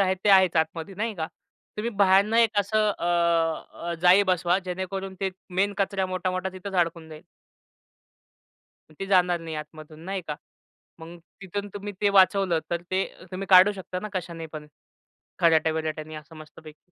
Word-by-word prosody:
आहे 190 -1 +2
ते - - +3
आहेच 190 -3 +5
आतमध्ये, 160 +4 -1
नाही 215 +2 -3
का? 160 -3 -3 0.5
तुम्ही 225 +3 -2
बाहेरनं 200 +3 +4
एक 225 -3 +3
असं 215 +1 +2
अ, - - -4 0.9
अ, - - -2
जाळी 180 +3 +7
बसवा, 175 +1 +1
जेणेकरून 190 +1 -5
ते 190 -1 0 0.3
मेन 200 +1 +2
कचरा 195 -1 0
मोठा-मोठा 185 0 -2
तिथेच 190 +1 -8
अडकून 170 -2 0
जाईल. 155 0 -11 1.7
मग - - -18
ते 195 - -3
जाणार 180 -3 +3
नाही 165 -1 -6
आतमधून 155 0 -10
नाही 190 0 -4
का? 150 - -2 0.6
मग 165 +1 -10 0.3
तिथून 200 +2 -5
तुम्ही 205 0 -6
ते 205 - +3
वाचवलं 195 -2 +4
तर 170 0 -2
ते 190 +1 +1
अ, - - -16
तुम्ही 185 +1 -5
काढू 185 +2 +8
शकता 190 -2 -6
ना 215 - -5
कशाने 170 -3 -5
पण, 155 -1 -9 0.7
खराट्या-विराट्याने 155 -1 +1
असं, 155 +1 -11
मस्तपैकी. 155 +2 -14
185 Hz, 165 wpm, -25 LUFS, 165-195 Hz, 1.7 s, काढू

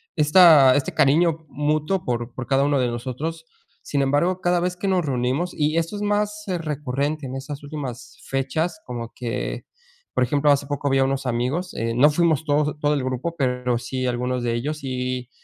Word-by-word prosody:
esta 150 -4 +7
este 140 - -2
cariño 160 +3 +3
mutuo 150 +6 -1
por 120 -1 -3
por 130 - -6
cada 135 0 +3
uno 145 -1 +2
de 125 - +2
nosotros. 130 +7 -4 0.4
Sin 140 - -1
embargo, 145 +7 +1
cada 175 -1 +2
vez 180 0 -2
que 195 - -3
nos 185 -4 +1
reunimos, 135 +6 -1
y 150 +1 0
esto 165 +5 -1
es - - -6
más 210 0 -1
recurrente 150 -4 -2
en 130 0 -5
esas 140 +2 -6
últimas 140 -4 -7
fechas, 135 +8 -2
como 120 -2 -6
que, 120 -2 -4 0.5
por - - +2
ejemplo, 145 +4 +2
hace 140 0 +2
poco 145 -1 -2
vi 135 0 +2
a - - +4
unos 135 0 -1
amigos, 125 +9 -1
eh, 115 0 -2
no 140 +6 +5
fuimos 160 -1 +1
todos, 150 0 0
todo 150 0 +2
el 140 - -1
grupo, 130 +6 -3
pero 125 -2 0
sí 130 +1 -4
algunos 125 0 -1
de 120 - 0
ellos, 145 +6 -3
y 125 -1 -3
140 Hz, 190 wpm, -23 LUFS, 125-160 Hz, 0.5 s, esta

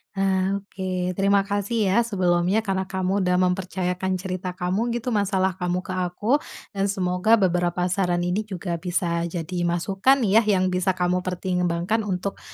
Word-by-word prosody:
Ah 195 0 +1
oke, 185 -2 -3
terima 195 +1 +2
kasih 205 +1 0
ya 220 - +4
sebelumnya 185 -2 +1
karena 190 -2 -1
kamu 190 +1 -1
udah 180 -1 +2
mempercayakan 185 0 0
cerita 185 -1 -4
kamu 195 +6 -1
gitu, 240 +1 -2
masalah 195 -3 +1
kamu 180 0 -1
ke - - -7
aku, 185 +9 0 0.3
dan 195 0 -1
semoga 185 +2 +2
beberapa 180 -3 +1
saran 175 -2 +1
ini 180 +3 0
juga 175 -3 -4
bisa 170 -1 -1
jadi 170 +1 -5
masukan 195 +10 +2
ya, 210 +1 +5
yang 185 -3 +2
bisa 185 +1 +1
kamu 180 0 +1
pertimbangkan 180 +2 -1
untuk, 190 +1 -3
185 Hz, 155 wpm, -24 LUFS, 180-200 Hz, 0.3 s, ya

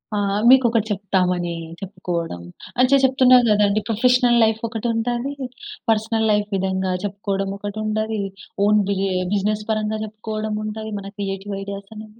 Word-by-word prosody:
ఆ! - - +1 0.3
మీకొకటి 235 -4 +5
చెప్తామని 180 -3 0 0.3
చెప్పుకోవడం 170 - -4 0.4
అన్ 255 - +6
చె - - +7
చెప్తున్నా 260 -1 +6
కదండీ 210 0 +3
ప్రొఫెషనల్ 245 +2 +3
లైఫ్ 220 0 +2
ఒకటుంటది. 235 +3 -2 0.6
పర్సనల్ 220 0 +1
లైఫ్ 210 0 +1
విధంగా 190 0 -1
చెప్పుకోవడం 195 -1 -2
ఒకటి 205 +1 -6
ఉంటది. 215 0 -1 0.5
ఓన్ 210 0 +4
బిరె 195 -1 0 0.3
బిజినెస్ 210 +1 0
పరంగా 215 0 0
జెప్పుకోవడం 215 0 -4
ఉంటది, 220 +1 -5
మన 195 0 -7
క్రియేటివ్ 195 0 -4
ఐడియాస్ 200 0 -7
అనేవి 215 +1 -11
210 Hz, 135 wpm, -21 LUFS, 195-225 Hz, 0.6 s, చె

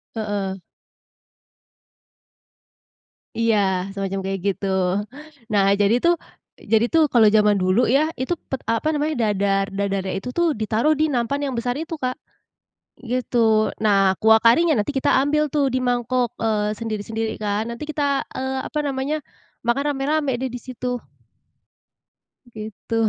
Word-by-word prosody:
Heeh. 200 -3 -3 2.8
Iya 230 -2 +3 0.4
semacam 195 -1 -3
kayak 195 0 -2
gitu. 200 0 -1 0.9
Nah 200 -1 +4 0.2
jadi 205 +4 +4
tuh 345 0 +5 0.6
jadi 225 +1 +5
tuh 325 -1 +5
kalau 225 -3 +5
zaman 210 -1 +4
dulu 185 +5 +2
ya, 305 +6 +2
itu 260 - 0 0.2
pet 265 - -3
apa 230 +6 0
namanya, 300 +1 0
dadar 195 -1 +1
dadarnya 195 -1 -2
itu 250 - -6
tuh 340 -3 +3
ditaruh 220 +7 +1
di 310 +1 +1
nampan 275 +2 -1
yang 275 -2 -2
besar 245 +1 -1
itu 325 0 -5
Kak, 255 -3 -2 0.9
gitu. 230 -3 +1
Nah 195 -3 +4
kuah 220 0 +6
karinya 310 +6 +5
nanti 210 +7 -1
kita 270 - 0 0.2
ambil 300 +1 +1
tuh 290 0 +1
di 255 - 0
mangkok, 245 0 0
eee, 215 -1 0
sendiri-sendiri 220 0 -4
kan, 210 +1 -1
nanti 265 +6 -7
kita, 285 -2 -1
eee, 265 0 -2
apa 300 - -4
namanya, 275 +2 -1 0.5
makan 240 +5 +1
rame-rame 280 -1 0
deh 255 0 -4
di 245 - -6
situ. 250 -1 -4 1.5
Gitu. 215 +1 -6
235 Hz, 140 wpm, -22 LUFS, 210-275 Hz, 2.8 s, kuah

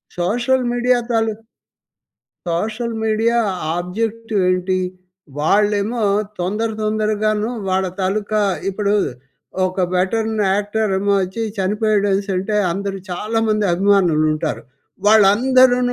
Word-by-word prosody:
Social 240 +9 +1
media 245 0 +2
తాలుక్ 225 -1 -1 1.0
social 220 +7 -2
media 225 +2 +1 0.4
objective 220 +3 -2
ఏంటి? 185 +1 0 0.6
వాళ్ళేమో 205 +7 +1 0.4
తొందర, 210 +6 -1
తొందరగాను 215 0 0 0.2
వాళ్ళ 190 0 +1
తాలుకా 210 +3 0 0.3
ఇప్పుడు 200 +1 -1 0.7
ఒక 185 +1 -3
వెట్రన్ 220 +4 0 0.2
యాక్టర్ 205 +1 -1
ఏమో 200 +1 +1
వచ్చి 190 +5 -4 0.2
చనిపోయాడనేసి 205 0 +1
అంటే 195 +3 -2 0.2
అందరూ 195 +1 -4
చాలామంది 215 +2 0
అభిమానులు 180 -4 +3
ఉంటారు. 155 0 -3 0.4
వాళ్ళందరూ 245 +5 +5
210 Hz, 95 wpm, -19 LUFS, 190-225 Hz, 1.0 s, వాళ్ళందరూ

